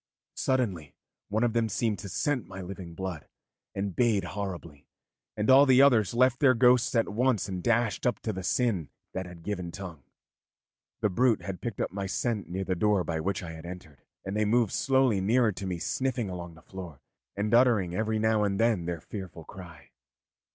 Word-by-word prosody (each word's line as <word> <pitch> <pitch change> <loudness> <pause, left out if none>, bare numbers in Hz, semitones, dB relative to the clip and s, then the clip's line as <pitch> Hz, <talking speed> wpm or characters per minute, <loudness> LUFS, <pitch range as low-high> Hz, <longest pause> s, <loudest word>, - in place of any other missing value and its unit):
Suddenly 100 - -1 0.3
one 110 +3 +1
of 120 -2 +1
them 115 -1 +1
seemed 110 -2 -1
to 100 - -7
scent 130 - -1
my 95 0 -9
living 90 -2 -8
blood, 90 -4 -5 0.5
and 100 -2 -3
bayed 115 -6 +2
horribly, 90 -6 -6 0.5
and 105 0 -1
all 135 +2 +7
the 130 +1 +7
others 120 -6 +4
left 125 0 +3
their 130 -3 +5
ghosts 125 +1 +4
at 115 - +3
once 115 -1 +1
and 95 -2 -4
dashed 115 +2 +1
up 120 -5 0
to 110 - -2
the 95 - -5
sin 90 - 0 0.2
that 95 -1 -4
had 85 -2 -12
given 90 -4 -4
tongue. 85 -6 -8 1.0
The 105 - +1
brute 120 +3 +2
had 95 -2 -6
picked 115 -4 -5
up - - -1
my 100 0 -4
scent 105 +2 -2
near 95 +2 -3
the 95 - -1
door 100 +1 +2
by 80 -2 -2
which 95 +3 -2
I 85 - -6
had 80 +1 -9
entered, 90 -6 -10 0.2
and 95 +1 -4
they 105 - +2
moved 115 0 +2
slowly 130 -7 +2
nearer 115 +3 +3
to 95 0 -6
me 90 -2 -2
sniffing 120 +2 -2
along 85 -2 -7
the 80 - -17
floor, 90 -8 -9 0.4
and 105 +2 -1
uttering 115 -8 +4
every 110 +3 0
now 110 -1 +2
and 100 -1 0
then 115 -7 +2
their 85 -2 -3
fearful 95 -5 -8
cry. 85 -3 -12
100 Hz, 195 wpm, -28 LUFS, 90-115 Hz, 1.0 s, all